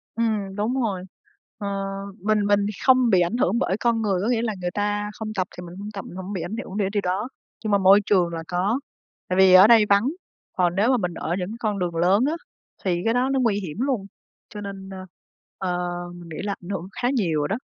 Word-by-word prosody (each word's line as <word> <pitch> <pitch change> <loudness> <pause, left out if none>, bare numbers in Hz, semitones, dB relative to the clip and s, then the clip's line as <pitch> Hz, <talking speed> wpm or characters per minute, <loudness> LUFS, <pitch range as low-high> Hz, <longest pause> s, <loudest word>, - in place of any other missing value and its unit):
Ừm, 215 -4 -1
đúng 210 +4 -1
rồi. 195 -6 -1 0.5
Ờ, 205 - -5 0.6
mình 210 -1 +2
mình 205 0 +4
thì - - -2
không 255 -2 +5
bị 185 -4 +5
ảnh 175 +8 0
hưởng 230 -1 +2
bởi 190 -6 0
con 235 -1 +1
người, 195 -4 0
có 205 - -1
nghĩa 235 -2 +2
là 225 -2 -1
người 175 0 -2
ta 205 0 -1
không 215 0 -6
tập 185 -3 0
thì - - -6
mình 170 +1 -10
hông 205 +1 -6
tập, 195 - -6
mình - - -10
hổng 190 +2 -6
bị 185 - -3
ảnh 215 - -4
hưởng 205 -5 -6
để 200 -2 +1
điều 205 -1 0
đó. 195 +6 -2 0.3
Nhưng 215 - -1
mà 200 - +5
môi 195 +1 +7
trường 180 -4 +3
là 165 0 -4
có, 190 +7 0 0.5
tại 185 - -1
vì 190 -1 +7
ở 185 +2 +9
đây 225 -2 +7
vắng, 200 +4 +4 0.5
còn 175 -1 +1
nếu 205 +5 +3
mà 255 - +3
mình 180 -5 -2
ở 170 +1 -2
những 180 0 -3
con 210 -3 -1
đường 175 -2 -2
lớn 185 +7 +3
á, 300 - +1 0.5
thì 175 -3 0
cái 225 - +3
đó 250 +2 +2
nó 270 - +2
nguy 225 -5 +2
hiểm 180 -5 -6
luôn, 255 -6 0 0.4
cho 210 - -8
nên, 195 -1 -7
ơ, 190 -1 -8 0.5
ờ, 180 -1 -2 0.3
mình 175 -1 -11
nghĩ 160 - -7
là 200 -1 -2
ảnh 175 - -9
hưởng 190 -2 -4
khá 245 - +2
nhiều 165 - +1
đó. 200 - -1
200 Hz, 250 wpm, -24 LUFS, 185-220 Hz, 0.6 s, ở